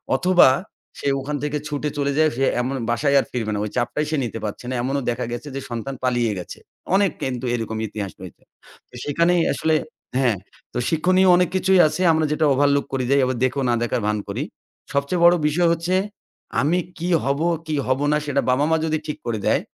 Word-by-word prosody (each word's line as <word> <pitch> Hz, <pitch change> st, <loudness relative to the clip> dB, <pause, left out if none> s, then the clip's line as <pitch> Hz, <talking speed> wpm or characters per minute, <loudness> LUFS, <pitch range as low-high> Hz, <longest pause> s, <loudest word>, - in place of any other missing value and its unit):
অথবা 180 Hz, +3 st, +5 dB, 0.5 s
সে -, -, -3 dB
ওখান 145 Hz, +2 st, -4 dB
থেকে 150 Hz, 0 st, -1 dB
ছুটে 150 Hz, 0 st, -2 dB
চলে 140 Hz, -1 st, 0 dB
যায় 155 Hz, 0 st, +4 dB
সে 135 Hz, -, +1 dB, 0.2 s
এমন 130 Hz, +2 st, -2 dB
বাসায়ই 140 Hz, +4 st, +2 dB
আর -, -, -1 dB
ফিরবে 115 Hz, -4 st, -2 dB
না। 105 Hz, -, -2 dB
ওই -, -, -4 dB
চাপটাই 120 Hz, +5 st, 0 dB
সে 155 Hz, -, +1 dB
নিতে 115 Hz, -1 st, -5 dB
পারছে 105 Hz, +3 st, -6 dB
না। -, -, -2 dB
এমনও 135 Hz, +2 st, -1 dB
দেখা 120 Hz, +1 st, -2 dB
গেছে 120 Hz, +5 st, -5 dB
যে 135 Hz, -, -3 dB
সন্তান 120 Hz, +3 st, -4 dB
পালিয়ে 120 Hz, -3 st, +1 dB
গেছে। 90 Hz, -, -8 dB, 0.4 s
অনেক 200 Hz, -3 st, +3 dB
কিন্তু 130 Hz, -1 st, -3 dB
এরকম 110 Hz, -1 st, -4 dB
ইতিহাস 100 Hz, -2 st, -5 dB
রয়েছে। 95 Hz, -2 st, -11 dB, 0.5 s
তো -, -, -16 dB
সেখানেই 170 Hz, +4 st, +2 dB
আসলে 160 Hz, 0 st, +1 dB, 0.4 s
হ্যাঁ, 120 Hz, -6 st, +2 dB, 0.4 s
তো -, -, -3 dB
শিক্ষনীয় 185 Hz, +4 st, +3 dB
অনেক 180 Hz, -1 st, +2 dB
কিছুই 190 Hz, 0 st, +3 dB
আছে 165 Hz, -, -3 dB
আমরা 160 Hz, -1 st, +2 dB
যেটা 155 Hz, 0 st, +1 dB
ওভারলুক 140 Hz, +1 st, +2 dB
করে 130 Hz, -1 st, 0 dB
যাই। 140 Hz, -, +5 dB
আবার 130 Hz, -1 st, -1 dB
দেখোও 130 Hz, +1 st, -1 dB
না -, -, +3 dB
দেখার 120 Hz, 0 st, -1 dB
ভান 105 Hz, 0 st, +1 dB
করি। 105 Hz, +8 st, -3 dB, 0.5 s
সবচেয়ে 140 Hz, +5 st, 0 dB
বড় 175 Hz, +1 st, +7 dB
বিষয় 170 Hz, +3 st, +2 dB
হচ্ছে 170 Hz, +2 st, -1 dB, 0.7 s
"আমি 165 Hz, +6 st, +2 dB, 0.2 s
কী 175 Hz, +2 st, -3 dB
হব, 140 Hz, +1 st, 0 dB, 0.3 s
কী 155 Hz, -, -1 dB
হব 130 Hz, +1 st, +1 dB
না, 150 Hz, -, +3 dB
সেটা 140 Hz, -1 st, +1 dB
বাবা-মা 145 Hz, +5 st, +2 dB
যদি 155 Hz, -1 st, 0 dB
ঠিক 150 Hz, -, -4 dB
করে 115 Hz, -3 st, -2 dB
দেয়, -, -, +3 dB
140 Hz, 205 wpm, -22 LUFS, 125-160 Hz, 0.7 s, বড়